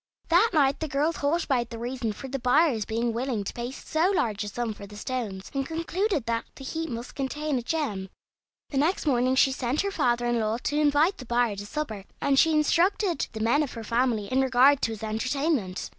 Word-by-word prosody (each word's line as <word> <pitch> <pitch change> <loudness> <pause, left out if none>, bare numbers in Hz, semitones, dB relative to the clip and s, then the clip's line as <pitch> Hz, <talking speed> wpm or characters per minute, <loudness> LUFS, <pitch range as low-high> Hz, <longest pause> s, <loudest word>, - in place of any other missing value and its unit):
That 360 +7 +5
night 280 -4 +3
the 315 - -2
girl 290 +3 +1
thought 320 +2 0
about 245 -4 0
the 230 - -7
reason 240 -1 -3
for 270 +6 -8
the 270 +1 -4
buyer's 250 -3 +3
being 230 +1 -1
willing 235 -3 -2
to - - -5
pay 240 0 -4
so 315 +6 0
large 220 - 0
a - - -5
sum 225 +2 -3
for 200 -1 -10
the 205 +1 -11
stones, 210 -5 -4
and 275 -1 0
concluded 330 - -1
that 230 0 -1
the 270 - -10
heap 325 +4 -4
must 235 0 -6
contain 285 +1 -2
a - - -4
gem. 230 -9 -2 0.6
The 275 - 0
next 325 +6 +1
morning 255 -2 +2
she 270 0 +4
sent 260 +2 -1
her 400 - -2
father 240 -8 +1
in 240 -1 +1
law 220 +1 0
to 295 - -1
invite 300 +5 +3
the 255 - -8
buyer 240 -2 +1
to 205 +1 -7
supper, 220 -8 -4
and 275 -1 +3
she 325 - +5
instructed 340 +3 +2
the 220 - -5
men 235 +7 +3
of 290 - -3
her 230 - -7
family 230 -1 +1
in 260 +5 +1
regard 265 +2 +5
to 225 - 0
his 220 -1 -7
entertainment. 230 - -1
260 Hz, 220 wpm, -27 LUFS, 230-300 Hz, 0.6 s, That